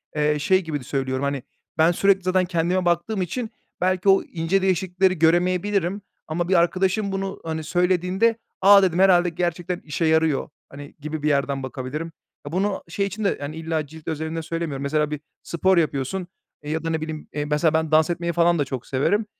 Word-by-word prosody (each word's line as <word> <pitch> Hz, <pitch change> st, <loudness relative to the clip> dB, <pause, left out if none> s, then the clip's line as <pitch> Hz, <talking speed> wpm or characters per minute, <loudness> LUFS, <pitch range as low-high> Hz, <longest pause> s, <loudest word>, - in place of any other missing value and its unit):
eee, 150 Hz, 0 st, +1 dB
şey 185 Hz, +6 st, +3 dB
gibi 155 Hz, -3 st, -3 dB
de -, -, -11 dB
söylüyorum, 130 Hz, 0 st, -2 dB
hani, 140 Hz, -2 st, -2 dB, 0.3 s
ben, 160 Hz, +2 st, +5 dB
sürekli 195 Hz, +2 st, +3 dB
zaten 185 Hz, 0 st, +2 dB
kendime 175 Hz, +1 st, 0 dB
baktığım 175 Hz, +4 st, 0 dB
için 220 Hz, +6 st, -3 dB, 0.3 s
belki 185 Hz, +1 st, +2 dB
o 195 Hz, -, +5 dB
ince 175 Hz, +3 st, -1 dB
değişiklikleri 185 Hz, -1 st, +1 dB
göremeyebilirim 180 Hz, +3 st, +2 dB, 0.3 s
ama 170 Hz, +3 st, -2 dB
bir -, -, +3 dB
arkadaşım 190 Hz, +4 st, +2 dB
bunu, 195 Hz, 0 st, -3 dB
hani, 160 Hz, -1 st, -4 dB
söylediğinde, 180 Hz, +6 st, +1 dB, 0.2 s
"A!" 200 Hz, 0 st, +8 dB
dedim, 180 Hz, -1 st, +1 dB
"Herhâlde 180 Hz, -2 st, +5 dB
gerçekten 175 Hz, +1 st, -2 dB
işe 160 Hz, +2 st, -2 dB
yarıyor" 160 Hz, -3 st, +2 dB, 0.2 s
hani, 145 Hz, 0 st, -11 dB
gibi 155 Hz, 0 st, -5 dB
bir 155 Hz, -, +2 dB
yerden 140 Hz, -1 st, 0 dB
bakabilirim. 130 Hz, +5 st, -5 dB, 0.3 s
Ya, 145 Hz, -, -6 dB
bunu 195 Hz, +3 st, -1 dB
şey 200 Hz, +4 st, -1 dB
için 205 Hz, +2 st, -5 dB
de, 200 Hz, -, +1 dB
yani, 145 Hz, +2 st, -5 dB
illa 160 Hz, -2 st, -3 dB
cilt 160 Hz, +1 st, -14 dB
özelinde 160 Hz, +1 st, -3 dB
söylemiyorum, 160 Hz, -4 st, -4 dB
mesela 150 Hz, +1 st, 0 dB
bir 150 Hz, -, -3 dB, 0.2 s
spor 185 Hz, +2 st, +1 dB
yapıyorsun, 160 Hz, +3 st, -1 dB, 0.4 s
eee, 150 Hz, -, -5 dB
ya 160 Hz, 0 st, -2 dB
da 165 Hz, -, -2 dB
ne 160 Hz, -1 st, -1 dB
bileyim, 155 Hz, -1 st, -6 dB
eee, 145 Hz, 0 st, -2 dB
mesela 150 Hz, +2 st, +1 dB
ben 160 Hz, -1 st, 0 dB
dans 155 Hz, +2 st, +4 dB
etmeyi 170 Hz, 0 st, -2 dB
falan 170 Hz, -1 st, +3 dB
da 145 Hz, -, +1 dB
çok 130 Hz, -2 st, -6 dB
severim. 200 Hz, +11 st, +1 dB
170 Hz, 190 wpm, -23 LUFS, 155-185 Hz, 0.4 s, A